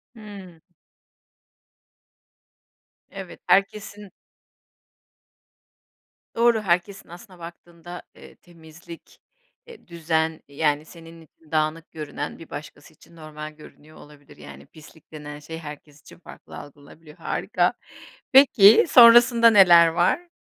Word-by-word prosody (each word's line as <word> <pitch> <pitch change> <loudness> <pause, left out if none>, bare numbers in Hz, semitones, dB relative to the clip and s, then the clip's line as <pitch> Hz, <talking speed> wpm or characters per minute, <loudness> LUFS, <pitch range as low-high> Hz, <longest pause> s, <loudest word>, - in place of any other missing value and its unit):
Hıı. 195 -6 -14 2.5
Evet, 195 -2 -11
herkesin 205 +1 -2 2.3
Doğru, 235 -1 +1
herkesin 185 0 -3
aslına 180 +1 -15
baktığında, 170 +1 -13
eee, - - -17
temizlik, 165 0 -17 0.5
eee 475 - -17
düzen, 160 -1 -3
yani, 145 +1 -3
senin 165 0 -16
için 160 0 -25
dağınık 155 +1 -3
görünen 150 -1 -8
bir 165 - -15
başkası 155 +1 -12
için 170 - -23
normal 155 -1 -11
görünüyor 155 0 -19
olabilir. 145 - -19
Yani 70 -1 -14
pislik 155 0 -20
denen 150 -1 -11
şey 160 +2 -10
herkes 150 -1 -13
için - - -18
farklı - - -15
algılanabiliyor, 150 +2 -16
harika. - - -3 0.6
Peki, 235 -6 +5
sonrasında 235 -1 +6
neler 175 -5 +5
var? 180 - -2
165 Hz, 105 wpm, -22 LUFS, 155-195 Hz, 2.5 s, sonrasında